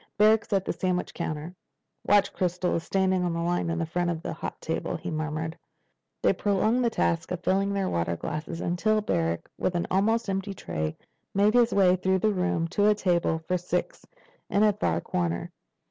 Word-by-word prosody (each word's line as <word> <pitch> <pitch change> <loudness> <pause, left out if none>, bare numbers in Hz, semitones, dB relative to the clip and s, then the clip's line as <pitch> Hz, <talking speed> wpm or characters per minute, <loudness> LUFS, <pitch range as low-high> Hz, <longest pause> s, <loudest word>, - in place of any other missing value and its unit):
"Barrack's 215 +2 +4
at 195 -2 +1
the - - -1
sandwich 180 -1 -1
counter. 155 0 -4 0.5
Watch 205 -1 +4
Crystal 180 0 0
is 165 - 0
standing 190 +1 +1
in 170 -1 -1
line 175 -1 0
in 165 0 -1
front 175 +2 -1
of 165 -1 -3
the - - -3
hot 155 - -6
table," 160 - -3
Ken 170 +1 -5
murmured. 155 +1 -3 0.7
They - - +5
prolonged 215 +5 +1
the 235 - +3
task 165 -7 0
of 180 - -4
filling 195 +1 +2
their 195 -1 0
water 85 - 0
glasses 155 - -5
until 215 +5 +1
Barrack, 85 - -1
with 185 - 0
an 175 - 0
almost 225 +5 +2
empty 195 0 -2
tray, 80 - -4 0.4
made 205 +2 +4
his 240 -1 +4
way 185 -2 +4
through 190 +1 +1
the 215 +3 +1
room 180 -3 0
to 205 +3 +2
a 210 - +5
table 170 -4 +1
for 180 0 +1
six 180 0 -3 0.5
in 200 - +3
a 210 -1 +5
far 205 - 0
corner. 85 -1 -2
180 Hz, 190 wpm, -27 LUFS, 165-200 Hz, 0.7 s, They